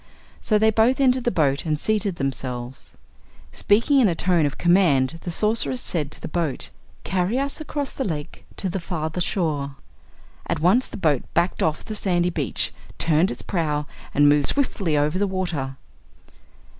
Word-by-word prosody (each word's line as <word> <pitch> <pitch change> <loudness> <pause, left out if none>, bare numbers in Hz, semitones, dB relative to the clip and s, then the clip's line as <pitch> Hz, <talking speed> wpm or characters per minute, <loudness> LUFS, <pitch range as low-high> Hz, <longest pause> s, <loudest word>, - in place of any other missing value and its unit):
So 215 - +2
they 220 +1 +4
both 225 +5 +3
entered 255 -2 +3
the - - +4
boat 140 - +1
and 155 -2 -1
seated 210 -2 0
themselves. 130 -3 -4 0.5
Speaking 230 +7 +3
in 245 - +5
a 175 - +1
tone 170 -3 +2
of 145 - -5
command 165 -5 +3
the - - -5
Sorceress 175 - 0
said 150 -5 -1
to - - -3
the - - -6
boat: 160 -4 -2 0.3
"Carry 190 +5 0
us 280 +3 -1
across 290 -2 -4
the 270 - -3
lake, 155 - -5
to 195 - -1
the 185 +1 -2
farther 165 -1 -3
shore." 150 -7 -1 0.7
At - - -1
once 190 +11 +3
the - - -7
boat 150 -8 +2
backed 170 +2 +1
off 155 -1 0
the 215 - -5
sandy 180 -4 +1
beach, 145 - -2 0.2
turned 165 +3 +3
its - - -5
prow 150 -5 -1 0.3
and 145 +1 +4
moved 145 -1 +4
swiftly 195 - 0
over 150 +5 +1
the 205 - +2
water. 170 -8 -3
175 Hz, 170 wpm, -23 LUFS, 150-205 Hz, 0.7 s, in